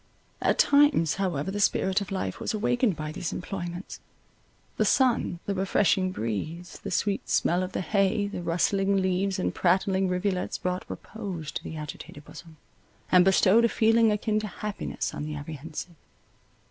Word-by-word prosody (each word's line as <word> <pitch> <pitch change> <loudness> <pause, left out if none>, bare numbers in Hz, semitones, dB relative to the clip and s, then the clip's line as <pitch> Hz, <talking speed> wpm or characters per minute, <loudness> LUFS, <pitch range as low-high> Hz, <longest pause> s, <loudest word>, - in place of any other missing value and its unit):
At - - +2
times 285 - +4
however 185 -3 -1
the 205 - -3
spirit 190 -1 +2
of 200 - -6
life 190 - -3
was - - -2
awakened 230 -1 +1
by 155 0 -5
these 165 +1 -4
employments; 175 0 -6 0.8
the - - +3
sun, 245 -9 +2
the 200 - -1
refreshing 190 -1 +2
breeze, 160 - -4
the - - -5
sweet 200 +3 -1
smell 175 +2 +2
of 185 0 -4
the - - -1
hay, 200 +3 +1
the 200 -3 -5
rustling 195 +4 +1
leaves 190 +1 0
and 185 - -1
prattling 190 +1 +2
rivulets 180 0 -1
brought 180 0 -3
repose 190 -8 -6
to - - -5
the 160 - -6
agitated 150 -1 -8
bosom, 165 0 -12 0.5
and 180 -1 +7
bestowed 195 +4 +5
a 235 - +4
feeling 225 0 +4
akin 215 +1 0
to 215 - -4
happiness 210 +2 -4
on - - -5
the 150 0 -4
apprehensive. 155 +3 -7
185 Hz, 160 wpm, -27 LUFS, 170-205 Hz, 0.8 s, and